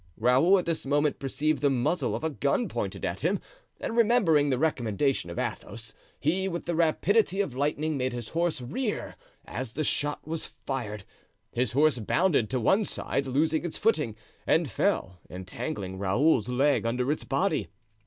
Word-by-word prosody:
Raoul 130 - +5
at 180 - -1
this 165 -1 -1
moment 145 +1 +1
perceived 145 +3 -1
the 145 - +4
muzzle 140 +7 0
of - - -5
a 160 - 0
gun 145 - 0
pointed - - -3
at - - -3
him, - - +1 0.4
and 230 - -3
remembering 210 -11 +4
the 130 - +1
recommendation 130 - 0
of 85 - -7
Athos, 110 +1 -5 0.3
he, 185 +6 +1
with 170 -2 -4
the 170 - -1
rapidity 185 +5 +2
of 195 -10 0
lightning, 150 +3 -1
made 130 0 0
his 120 -2 -6
horse 170 -4 0
rear 210 - -3 0.3
as 125 -2 -5
the 155 - -1
shot 145 +1 -1
was 165 0 -5
fired. 110 -7 -3 0.5
His 125 +1 -1
horse 145 -1 +3
bounded 140 - +2
to 130 - 0
one 195 - +3
side, 140 -7 -2
losing 155 +5 +1
its 170 -2 -4
footing, 150 - +1 0.3
and - - +3
fell, 90 -1 0
entangling 95 - -5
Raoul's 115 +5 +2
leg 140 +4 +2
under 125 +4 0
its 155 - -2
body. 155 +5 0
145 Hz, 170 wpm, -28 LUFS, 125-165 Hz, 0.5 s, Raoul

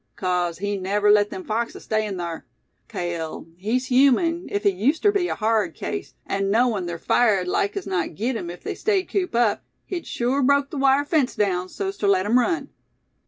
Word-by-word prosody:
"'Cause 180 -2 -1
he'd 205 +1 -3
never 205 +2 +2
let 205 0 +4
them 185 - -7
foxes 230 +3 -3
stay 215 0 0
in 195 -2 -4
thar. 170 -2 -5 0.4
Cale, 170 -3 -4
he's 220 +8 -1
human, 280 +7 +3
ef 205 - -1
he 200 - +4
used 245 - 0
ter 410 - +5
be 395 -3 0
a - - -2
hard 220 0 0
case; - - -5
an' 195 0 -1
knowin' 220 -4 +2
ther 170 0 -4
fire'd 200 -1 +2
like 200 +2 0
as - - -4
not 180 -4 -2
git 235 +7 -1
'em 175 -6 -4
if 175 - -9
they - - -3
stayed 395 -3 0
cooped 365 -10 -1
up, 235 -3 +2 0.2
he'd 355 -3 -5
sure 250 +4 0
broke 280 +1 +2
the 295 - -5
wire 275 +1 +4
fence 290 -4 +1
daown 185 -4 0
so's 390 - -4
ter 205 - 0
let 190 -1 +3
'em 235 +4 +4
run." 335 +6 0
215 Hz, 210 wpm, -23 LUFS, 190-270 Hz, 0.4 s, ter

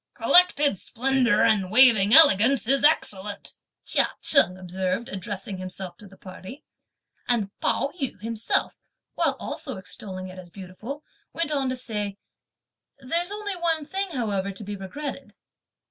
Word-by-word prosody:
"'Collected 295 - +4
splendour 255 0 +1
and 200 -4 +2
waving 220 -3 +5
elegance' 265 -4 +6
is 275 +2 +3
excellent," 205 -9 0 0.3
Chia - - +3
Cheng 185 - +4
observed 185 +4 -3
addressing 195 -1 -6
himself 185 -1 -6
to 210 - -14
the 195 0 -17
party; 190 +9 -11 0.6
and 220 -5 0
Pao 275 - 0
yü 270 - -3
himself, 225 +1 -1 0.3
while - - +1
also 265 -7 -5
extolling 185 0 -6
it 185 0 -10
as 180 -1 -12
beautiful, 200 - -9 0.3
went 330 -2 -1
on 275 -3 0
to 255 - -2
say: 210 -5 -4 0.8
"There's 335 +7 -1
only 410 -1 -4
one 330 -3 -1
thing 390 +5 -3
however 205 - -2
to 195 +2 -10
be 205 0 -6
regretted!" 215 +4 -7
220 Hz, 140 wpm, -24 LUFS, 190-275 Hz, 0.8 s, elegance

